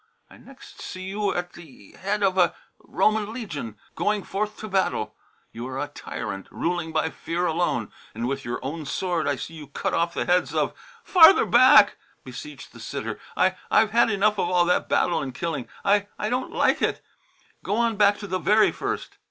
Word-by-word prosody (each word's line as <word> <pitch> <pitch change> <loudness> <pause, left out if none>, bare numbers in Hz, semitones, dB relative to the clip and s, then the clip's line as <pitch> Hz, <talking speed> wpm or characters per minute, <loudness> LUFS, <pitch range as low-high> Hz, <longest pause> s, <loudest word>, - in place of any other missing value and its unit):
"I - - -14
next 275 -1 -15
see 185 - -7
you 200 +1 -1
at 175 0 -3
the 145 - -15
head 205 +2 -2
of 190 -1 +2
a 180 -2 +3 0.2
Roman 215 0 0
legion, 155 - -6 0.2
going 210 -1 0
forth 210 +2 -3
to 215 - -7
battle. 185 - -1 0.4
You 120 +2 -7
are 130 0 -6
a 145 +1 -3
tyrant, 105 -8 -6
ruling 170 -1 -2
by 160 0 0
fear 170 +2 -3
alone, 165 -9 -1 0.2
and 115 +2 -2
with 135 +1 -3
your 120 - -4
own 150 +2 -5
sword 175 0 -1
I 145 - +1
see 160 - -7
you 155 -3 -10
cut 140 - -3
off 170 0 0
the - - -1
heads 180 0 +1
of - - 0 0.2
" - - -25
"Farther 360 0 +7
back," - - +6 0.3
beseeched 300 -1 -10
the - - -13
sitter. - - -5 0.2
"I - - +3
I've 215 -1 +4
had 235 +1 +4
enough 210 0 +1
of - - 0
all 180 -1 +3
that 180 - +1
battle 170 -2 +2
and 130 -3 -6
killing. 155 -6 -3 0.2
I 200 0 +3
I 210 - -2
don't 255 +1 -2
like - - +2
it. - - -1 0.6
Go 205 - -1
on 230 0 +1
back 205 0 +4
to 205 - -6
the 185 0 -2
very 210 +3 +4
first." - - -5
180 Hz, 200 wpm, -24 LUFS, 155-210 Hz, 0.6 s, Farther